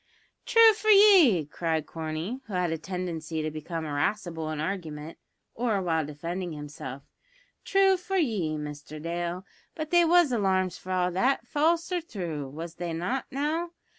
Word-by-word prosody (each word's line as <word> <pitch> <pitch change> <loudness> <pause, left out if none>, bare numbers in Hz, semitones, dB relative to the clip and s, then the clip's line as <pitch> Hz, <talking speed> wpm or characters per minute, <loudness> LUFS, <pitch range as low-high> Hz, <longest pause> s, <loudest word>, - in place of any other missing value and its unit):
"True 455 -1 +7
for 430 +1 -7
ye!" 380 - +7
cried 160 +1 -2
Corney, 160 - -4
who 210 - -8
had 180 -2 0
a 165 - -1
tendency 165 -3 -4
to 155 - -2
become 160 +1 -5
irascible 160 +2 -2
in 155 -1 -4
argument, 160 -3 -5 0.3
or 225 -4 0
while 165 -4 0
defending 170 +4 -5
himself; 145 -2 -8 0.6
"true 390 -1 +4
for 385 +2 -3
ye, 205 - 0
Mister 150 0 -7
Dale, 175 +3 -3 0.3
but 310 -1 -5
they 345 0 +6
was 340 -3 +5
alarms 190 -5 +1
for 185 - -8
all 180 -1 +1
that, 250 +10 +1
false 330 +4 +1
or 355 -1 0
thrue, 170 - -5
was 160 +4 -8
they 175 -1 -3
not 180 +11 -2
now? 315 +5 -2
180 Hz, 160 wpm, -27 LUFS, -, 0.6 s, True